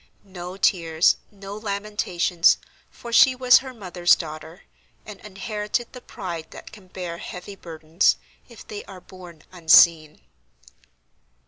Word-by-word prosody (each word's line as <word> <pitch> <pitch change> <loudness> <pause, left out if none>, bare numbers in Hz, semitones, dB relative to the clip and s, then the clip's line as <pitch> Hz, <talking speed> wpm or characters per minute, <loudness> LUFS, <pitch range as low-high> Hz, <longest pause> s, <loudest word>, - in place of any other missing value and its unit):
No 185 -1 -9
tears, 165 -4 +2
no 200 -1 -10
lamentations, 200 -5 0 0.3
for 235 -1 -11
she 260 +2 +6
was 250 -1 +5
her 260 0 -9
mother's 180 -6 +2
daughter, 160 +2 -9 0.4
and 210 -2 -10
inherited 210 +3 -5
the 250 - -10
pride 170 -8 -7
that - - -12
can 205 -4 -16
bear 180 -2 -7
heavy 185 +3 -9
burdens, 165 0 0 0.3
if 235 - -14
they 210 -1 -7
are 190 -2 -12
borne 175 -4 -14
unseen. 160 -3 +4
185 Hz, 125 wpm, -23 LUFS, 170-210 Hz, 0.4 s, she